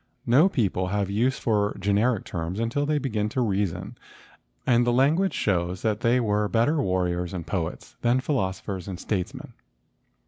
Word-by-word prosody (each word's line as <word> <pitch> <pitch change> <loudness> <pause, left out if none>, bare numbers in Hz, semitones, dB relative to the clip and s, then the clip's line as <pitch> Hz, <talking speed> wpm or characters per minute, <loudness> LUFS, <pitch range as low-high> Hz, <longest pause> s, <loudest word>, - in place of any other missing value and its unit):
No 145 +11 +5
people 95 - 0
have 100 0 -1
use 120 +6 +1
for 105 -2 0
generic 105 +3 +1
terms 85 +3 -4
until 120 +6 0
they 155 0 +2
begin 110 -7 -1
to 125 - -1
reason 100 0 -2 0.7
and 120 -1 +4
the 120 - +2
language 150 +10 +2
shows 90 -2 -1
that 110 -2 0
they 120 +2 +3
were 105 -3 +1
better 120 - +2
warriors 90 -3 -1
and 85 -3 -5
poets 85 -5 -4
than 120 +2 +3
philos¬ 110 -9 -1
ophers 95 -2 -5
and 95 -3 -5
statesmen. 95 -4 -4
105 Hz, 165 wpm, -25 LUFS, 95-125 Hz, 0.7 s, No